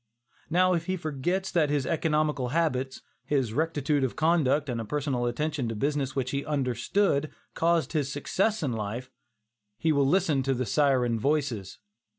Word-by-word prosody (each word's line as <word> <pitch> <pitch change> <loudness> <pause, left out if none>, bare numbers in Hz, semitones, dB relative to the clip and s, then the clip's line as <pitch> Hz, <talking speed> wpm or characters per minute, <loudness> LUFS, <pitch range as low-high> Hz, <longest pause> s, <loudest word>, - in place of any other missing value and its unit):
Now 185 +2 +3
if 170 0 -1
he 185 0 0
forgets 170 +5 -2
that 160 -4 +2
his 145 -2 0
economical 150 -3 0
habits, 135 -3 -1 0.2
his 135 -7 0
rectitude 150 -1 0
of 130 - -1
conduct 155 -3 +2
and 120 -3 -2
a - - -5
personal 135 -2 -1
attention 145 0 -2
to - - -2
a - - -6
business 140 +1 -1
which 130 -1 -1
he 140 0 -1
understood, 140 - 0 0.2
caused 170 -1 +1
his 145 -4 0
success 195 +8 0
in 135 -5 0
life, 115 +4 -4 0.7
he 160 - +1
will 140 -2 +3
listen 165 -4 +2
to 135 0 0
the 125 +1 -1
syren 125 -2 +2
voices. 135 -8 -1
145 Hz, 165 wpm, -27 LUFS, 130-160 Hz, 0.7 s, Now